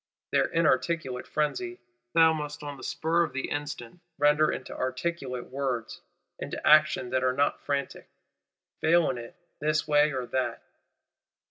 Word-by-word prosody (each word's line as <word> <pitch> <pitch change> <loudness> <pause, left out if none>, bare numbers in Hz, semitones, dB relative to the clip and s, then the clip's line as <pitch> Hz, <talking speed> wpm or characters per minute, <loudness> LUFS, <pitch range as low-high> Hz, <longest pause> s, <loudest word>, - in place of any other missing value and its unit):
Their - - +3
inarticulate 155 -4 0
frenzy 355 - -2 0.4
thou 160 -1 +6
must 150 -1 -5
on 145 -1 -5
the 135 - -12
spur 165 +2 +1
of 160 -6 -1
the 135 - -3
instant, 145 0 -5 0.2
render 150 +1 +4
into - - -6
articulate 130 -2 -3
words, 130 -4 -3 0.4
into - - -5
actions 155 -5 +5
that 130 0 +1
are 130 0 +2
not 140 +2 +1
frantic. 140 -1 -3 0.7
Fail 165 -1 +4
in 125 - -5
it, 115 0 -10 0.2
this 155 +1 0
way 150 0 +4
or 130 -2 -3
that! 130 +1 -2
145 Hz, 145 wpm, -28 LUFS, 130-155 Hz, 0.7 s, thou